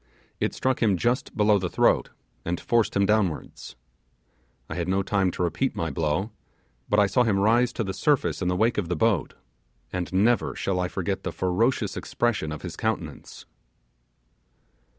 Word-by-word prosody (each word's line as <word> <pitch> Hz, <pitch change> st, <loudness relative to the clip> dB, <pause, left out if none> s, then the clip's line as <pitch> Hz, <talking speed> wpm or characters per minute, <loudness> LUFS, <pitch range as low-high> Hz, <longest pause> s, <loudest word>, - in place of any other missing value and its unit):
It -, -, -1 dB
struck 130 Hz, -1 st, 0 dB
him 105 Hz, -5 st, +3 dB
just 120 Hz, +7 st, -1 dB
below 105 Hz, -1 st, +4 dB
the 90 Hz, -2 st, -2 dB
throat, -, -, +2 dB, 0.3 s
and 85 Hz, +1 st, -2 dB
forced 115 Hz, -3 st, +1 dB
him 100 Hz, 0 st, +3 dB
downwards. 100 Hz, -6 st, -1 dB, 0.9 s
I -, -, -5 dB
had 85 Hz, +1 st, -3 dB
no 95 Hz, +1 st, +1 dB
time 95 Hz, -1 st, +1 dB
to 90 Hz, -, -3 dB
repeat 85 Hz, -, -1 dB
the 80 Hz, -2 st, -2 dB
blow, 80 Hz, +8 st, -1 dB, 0.6 s
but 105 Hz, -, +3 dB
I 105 Hz, -, +6 dB
saw 100 Hz, +6 st, +2 dB
him 110 Hz, -5 st, +2 dB
rise 115 Hz, +5 st, +3 dB
to 115 Hz, -, -2 dB
the 95 Hz, -2 st, -4 dB
surface 140 Hz, +6 st, +1 dB
in 90 Hz, -, 0 dB
the 90 Hz, -, +1 dB
wake 110 Hz, +4 st, +2 dB
of 90 Hz, -5 st, -3 dB
the 90 Hz, -, 0 dB
boat, 100 Hz, -1 st, +1 dB, 0.6 s
and 90 Hz, -1 st, -3 dB
never 110 Hz, +6 st, +2 dB
shall 95 Hz, -2 st, -1 dB
I 90 Hz, -, 0 dB
forget 95 Hz, +1 st, -3 dB
the -, -, -4 dB
ferocious 105 Hz, +4 st, 0 dB
expression 110 Hz, -10 st, -1 dB
of 75 Hz, -, -7 dB
his -, -, -6 dB
countenance. -, -, -4 dB
100 Hz, 175 wpm, -25 LUFS, 90-115 Hz, 0.9 s, I